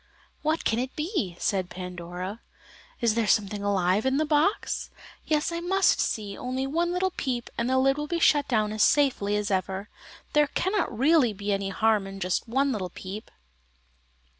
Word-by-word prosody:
"What 310 +2 0
can 225 - +2
it 255 +1 -3
be?" 300 - -2
said 190 -3 0
Pandora. 180 +3 -6 0.6
"Is 230 -2 +3
there 225 -1 0
something 205 -1 +1
alive 195 0 +1
in 265 +1 +1
the 310 - +2
box? 305 +7 +1 0.4
Yes, 305 +1 +1
I 335 - -2
must 380 +3 +2
just - - +2
see, 205 -2 -5
only 255 +1 -3
one 335 +5 0
little 370 +1 0
peep 250 -7 -3
and 235 +1 -1
the 260 - +2
lid 270 +1 +3
will 295 0 -3
be 340 - -1
shut 290 -3 +4
down 215 -5 +1
as 215 - -2
safely 255 -8 +3
as 210 0 -2
ever. 190 +2 -2 0.4
There 295 -1 +4
cannot 380 +7 0
really 270 -1 +3
be 200 +1 -2
any 195 0 -1
harm 215 0 +2
in 195 0 -8
just 185 +5 -1
one 270 +4 +1
little 195 -7 -3
peep." 195 +4 -8
230 Hz, 185 wpm, -27 LUFS, 200-295 Hz, 0.6 s, shut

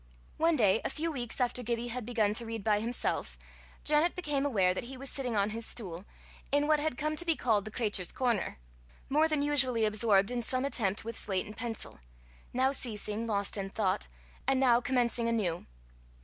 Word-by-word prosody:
One 325 +1 +3
day, 215 -5 +3
a - - -1
few 325 +2 -2
weeks 245 -5 -3
after 250 0 +1
Gibbie 235 0 -2
had 240 -1 -5
begun 220 -4 +1
to 235 +2 +1
read 225 -2 -5
by 210 -1 +2
himself, 235 +3 -1 0.5
Janet 305 +3 +3
became 295 -5 -1
aware 190 -8 +2
that 190 - -4
he 260 +2 -8
was 270 +1 -2
sitting 250 -4 -1
on 205 +1 +1
his 230 +1 -4
stool, 185 -6 -4 0.5
in 290 +1 +3
what 305 0 +3
had 295 -4 -2
come 305 +1 -1
to 345 - 0
be 330 -2 +2
called 220 -7 +1
the 215 - -6
cratur's 205 -6 0
corner, 240 - -1 0.5
more 305 +3 +3
than 305 -2 0
usually 260 -6 +4
absorbed 210 -1 +3
in 245 -1 -1
some 255 +3 -1
attempt 220 -7 0
with 230 0 -5
slate 190 -2 -1
and 210 - -9
pencil 225 -1 -4 0.5
now 260 +2 +2
ceasing, 225 -3 -1
lost 200 -1 0
in 195 -1 -3
thought, 195 -1 -1 0.4
and 270 -1 +3
now 245 -2 +4
commencing 240 -2 +1
anew. 190 -7 -1
235 Hz, 195 wpm, -31 LUFS, 210-270 Hz, 0.5 s, usually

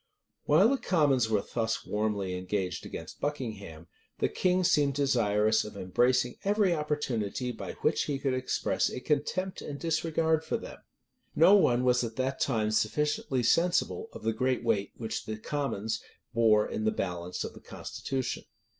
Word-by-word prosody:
[*] - - -53
While 170 +9 +5
the 275 - +2
commons 140 -9 +2
were 105 -2 +1
thus 110 -1 -1
warmly 105 -3 -1
engaged 90 0 -3
against - - -8
Buckingham, 105 - -4 0.3
the - - +1
king 185 0 +1
seemed 145 -6 +3
desirous 110 -6 +2
of 105 -1 -9
embracing 120 +6 +1
every 200 -2 +3
opportunity 130 -7 -2
by 115 - -6
which - - +2
he 145 - -1
could 135 -1 -1
express 130 0 0
a - - -5
contempt 155 +7 -1
and 140 -1 -6
disregard 160 0 +1
for 160 - -1
them. - - -10 0.6
No 165 +5 +7
one 125 -11 +4
was 125 -1 +3
at 115 -1 -4
that 130 +2 -1
time 110 -5 +1
sufficiently 130 +3 0
sensible 180 - +2
of - - -10
the 115 - +1
great 130 +2 0
weight 105 -4 0
which 110 -2 -4
the 110 0 -3
commons 110 -4 -2 0.3
bore 110 -2 +4
in 110 - -3
the 110 - +3
balance 90 -2 -3
of - - -6
the - - -13
constitution. 130 -2 -4
125 Hz, 165 wpm, -29 LUFS, 110-150 Hz, 0.6 s, No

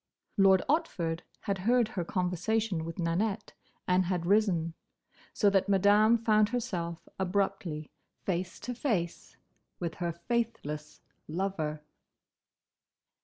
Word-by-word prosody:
Lord 195 -2 +5
Otford 180 - 0 0.2
had 200 -3 -2
heard 235 +3 +3
her 185 -5 -2
conversation 180 +1 0
with 165 0 -6
Nanette, 195 +5 -1 0.3
and 180 0 +3
had 175 -1 -1
risen; 180 -5 +2 0.6
so 210 - +2
that 195 0 +2
Madame 205 +4 +5
found 215 -2 +3
herself 185 -9 -3
abruptly 190 -5 -1 0.3
face 185 -1 -2
to 250 - -4
face 215 - -2 0.4
with 170 -2 -3
her 170 -1 0
faithless 170 -7 -3 0.3
lover. 155 -3 -2
190 Hz, 110 wpm, -30 LUFS, 170-215 Hz, 0.6 s, Lord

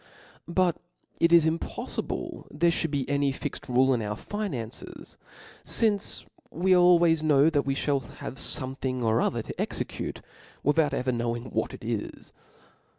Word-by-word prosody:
But 175 0 +2 0.4
ic 170 0 +4
is 170 -2 +7
impoflible 160 +1 -3
there 170 +3 +2
fliould 165 0 -1
be 140 -3 -1
any 140 0 +1
Bxed 135 - -6
rule 130 +2 +4
in 120 - 0
our 105 -1 -3
finances, 135 - -6 0.5
fince 210 -3 0 0.2
we 185 +3 +3
always 175 -3 +5
kno^ 150 0 +4
that 145 -3 +1
we 135 - +1
fliall 140 -2 -1
have - - -6
fomethin'g 130 -3 -2
or 115 0 +3
other - - 0
to - - -5
execute, - - -4 0.4
without 145 -1 +3
ever 130 0 0
knowing 120 +1 -2
what 110 - -1
it - - -13
is. 110 -2 -4
140 Hz, 150 wpm, -27 LUFS, 125-170 Hz, 0.5 s, is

